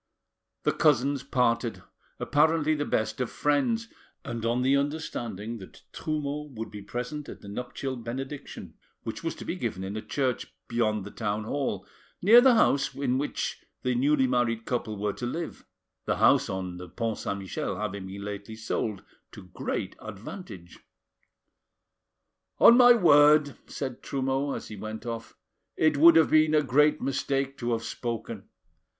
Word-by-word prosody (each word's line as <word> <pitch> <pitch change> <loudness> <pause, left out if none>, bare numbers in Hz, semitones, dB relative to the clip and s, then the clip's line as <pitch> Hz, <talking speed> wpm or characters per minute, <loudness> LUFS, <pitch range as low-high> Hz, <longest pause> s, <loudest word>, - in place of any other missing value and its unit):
The - - +3
cousins 140 -1 +2
parted, 120 -3 0 0.4
apparently 155 +1 +3
the 145 -1 -1
best 110 +4 -1
of 125 - -1
friends, 225 +11 +1 0.4
and 115 -1 -5
on 120 +2 +1
the 135 +2 +4
understanding 120 -7 -3
that 95 - -13
Trumeau 150 -1 -3
would 110 0 -6
be 105 -1 -8
present 125 +8 -5
at - - -10
the - - -12
nuptial 125 +5 -4
benediction, 130 +4 -7 0.3
which - - -6
was - - -2
to - - -9
be - - -2
given 95 - -3
in 95 +2 -5
a 110 - -3
church 130 -1 -2
beyond 110 -4 0
the 105 - -8
town 105 -1 -2
hall, 140 +5 -2 0.3
near 225 +6 +8
the 255 -1 +6
house 140 -10 +2
in 130 -2 0
which 145 - -3 0.2
the 125 - +1
newly 135 +2 +3
married 120 -3 0
couple 110 -4 -2
were 105 0 -1
to 120 - -4
live; 165 +6 -5 0.4
the - - +1
house - - +4
on 95 -2 -4
the 90 0 -9
Pont 115 +4 -3
Saint 100 - -3
Michel 95 0 -4
having 100 -2 -4
lately 100 +2 -7
been - - -15
sold 110 -2 -3 0.3
to 95 -4 -13
great - - -3
advantage. 100 - -9 1.8
"On 235 - +8
my 245 -1 +8
word," 150 - +5
said 130 -3 -5
Trumeau, 135 +1 -1
as - - -6
he 110 - -7
went 110 +3 -7
off, 115 -1 -6 0.4
"it 155 -1 +3
would 165 +4 +8
have 160 -1 +5
been 155 0 +5
a 150 - +4
great 150 +3 +3
mistake 135 0 -1
to 120 -1 -1
have 115 0 -2
spoken. 115 -2 -5
125 Hz, 160 wpm, -27 LUFS, 110-145 Hz, 1.8 s, near